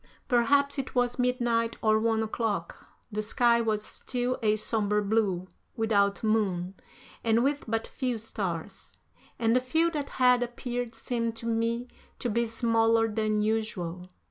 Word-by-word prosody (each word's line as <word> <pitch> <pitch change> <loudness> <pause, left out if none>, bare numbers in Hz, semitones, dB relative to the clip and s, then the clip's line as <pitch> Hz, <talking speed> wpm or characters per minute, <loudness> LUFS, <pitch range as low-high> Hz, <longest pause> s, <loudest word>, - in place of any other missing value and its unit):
Perhaps 280 +4 +3
it 265 - -5
was 245 0 +1
midnight 240 -2 +1
or 215 -1 +3
one 225 0 +1
o'clock. 215 -6 -3 0.2
The 215 0 -1
sky 235 +2 +3
was 215 -2 -1
still 250 0 -2
a 215 -1 +3
somber 210 -1 +1
blue, 200 -4 0 0.3
without 205 -3 +1
moon, 195 -5 0 0.5
and 230 +1 +3
with 285 +1 0
but 225 0 -1
few 250 -3 -2
stars, 195 -7 -5 0.4
and 230 0 +2
the 250 - +4
few 320 +7 +1
that 290 -3 -3
had 250 -1 +5
appeared 245 -1 -4
seemed 230 0 -2
to 225 - -7
me 230 +1 0 0.3
to 240 - -2
be 235 +2 +1
smaller 225 0 +2
than 215 -1 0
usual. 185 -5 -2
225 Hz, 145 wpm, -28 LUFS, 215-245 Hz, 0.5 s, had